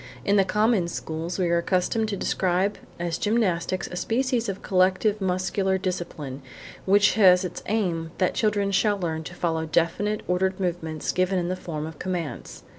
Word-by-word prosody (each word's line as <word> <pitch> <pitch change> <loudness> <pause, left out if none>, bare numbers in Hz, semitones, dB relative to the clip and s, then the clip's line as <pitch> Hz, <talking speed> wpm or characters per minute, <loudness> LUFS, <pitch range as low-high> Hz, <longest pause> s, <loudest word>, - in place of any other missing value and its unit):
In 200 - +3
the 195 - +5
common 210 0 +2
schools 165 +1 -4
we 185 -2 +1
are 170 - +3
accustomed 185 +5 0
to 200 - -2
describe 185 +2 0 0.2
as 170 -1 -2
gymnastics 190 -4 0
a - - -8
species 240 +3 0
of 195 - -5
collective 190 +3 +2
muscular 190 +1 0
discipline 170 -7 -4 0.4
which 205 +2 +5
has 185 -4 +6
as - - -2
its - - -9
aim 175 -7 -1
that 185 - +1
children 205 -2 +1
shall 205 +1 +2
learn 160 -4 -3
to 175 - -8
follow 160 -2 -1
definite 175 +6 0
ordered 185 +1 0
movements 165 -4 -2
given 185 +1 +1
in 175 -1 -1
the 185 - -1
form 155 -4 -5
of 160 -2 -9
commands. 180 -4 -5
185 Hz, 175 wpm, -25 LUFS, 170-200 Hz, 0.4 s, has